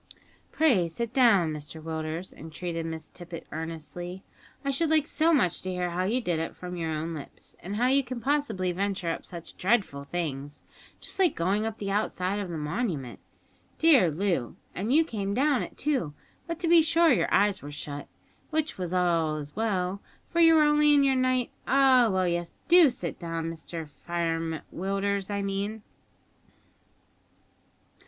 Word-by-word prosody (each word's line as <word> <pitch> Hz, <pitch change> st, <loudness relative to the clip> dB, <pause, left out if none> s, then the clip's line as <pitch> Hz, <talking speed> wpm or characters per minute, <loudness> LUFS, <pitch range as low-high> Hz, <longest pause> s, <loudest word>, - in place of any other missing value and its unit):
"Pray 245 Hz, -, +3 dB
sit 230 Hz, +8 st, -4 dB
down, 200 Hz, -, +4 dB
Mr 150 Hz, +1 st, -7 dB
Willders," 160 Hz, +2 st, -4 dB
entreated 165 Hz, +1 st, -5 dB
Miss 160 Hz, -1 st, -5 dB
Tippet 170 Hz, -2 st, -9 dB
earnestly; 165 Hz, +3 st, -6 dB, 0.4 s
"I 275 Hz, -, +1 dB
should 315 Hz, +4 st, +1 dB
like 310 Hz, -2 st, +3 dB
so 320 Hz, +1 st, +2 dB
much 250 Hz, -, +2 dB
to 185 Hz, -, -5 dB
hear 180 Hz, -1 st, -2 dB
how 180 Hz, +2 st, -1 dB
you 230 Hz, +6 st, +1 dB
did 175 Hz, -7 st, -1 dB
it 165 Hz, -, -4 dB
from 180 Hz, 0 st, -7 dB
your 165 Hz, -2 st, -3 dB
own 160 Hz, +1 st, -3 dB
lips, 150 Hz, -3 st, -9 dB
and 195 Hz, +4 st, -5 dB
how 235 Hz, +3 st, +1 dB
you 270 Hz, +2 st, +4 dB
can 250 Hz, -1 st, -5 dB
possibly 230 Hz, -10 st, 0 dB
venture 190 Hz, -2 st, -1 dB
up -, -, -6 dB
such 170 Hz, -2 st, -9 dB
dreadful 185 Hz, -9 st, +1 dB
things, 145 Hz, -3 st, -4 dB, 0.4 s
just -, -, -8 dB
like 370 Hz, -3 st, +4 dB
going 200 Hz, +6 st, +1 dB
up 225 Hz, -1 st, -5 dB
the 200 Hz, -1 st, -3 dB
outside 200 Hz, -1 st, -1 dB
of 200 Hz, -3 st, -4 dB
the 165 Hz, -, -4 dB
Monument. 150 Hz, -, -3 dB, 0.6 s
Dear 280 Hz, -, +6 dB
Loo, 170 Hz, -6 st, -1 dB, 0.2 s
and 205 Hz, +7 st, -2 dB
you 315 Hz, +4 st, +5 dB
came 200 Hz, -7 st, -3 dB
down 280 Hz, +1 st, +2 dB
it, -, -, -7 dB
too; 260 Hz, -, -1 dB, 0.3 s
but, 335 Hz, -1 st, -3 dB
to 345 Hz, -, 0 dB
be 335 Hz, 0 st, +7 dB
sure, 330 Hz, +1 st, +4 dB
your -, -, +1 dB
eyes 200 Hz, -1 st, +3 dB
were 145 Hz, -, -8 dB
shut, 145 Hz, 0 st, -5 dB, 0.4 s
which 310 Hz, -7 st, -1 dB
was 180 Hz, 0 st, -2 dB
as 160 Hz, -5 st, 0 dB
well, 200 Hz, -3 st, -1 dB, 0.2 s
for 340 Hz, -, -2 dB
you 330 Hz, -1 st, +7 dB
were 310 Hz, -, +6 dB
only 295 Hz, 0 st, +5 dB
in 285 Hz, -, +5 dB
your 270 Hz, -1 st, +4 dB
night 255 Hz, -1 st, +1 dB, 0.2 s
Ah, 260 Hz, -3 st, +5 dB
well, 185 Hz, -1 st, +1 dB
yes, 175 Hz, -1 st, -2 dB
do 345 Hz, -3 st, +7 dB
sit 250 Hz, +1 st, -5 dB
down 165 Hz, -1 st, -3 dB
Mr 165 Hz, 0 st, -7 dB
Firem 165 Hz, 0 st, -3 dB
Willders, 195 Hz, +1 st, -1 dB
I 200 Hz, -1 st, -2 dB
mean." 200 Hz, +2 st, -3 dB
190 Hz, 175 wpm, -27 LUFS, 165-255 Hz, 0.6 s, be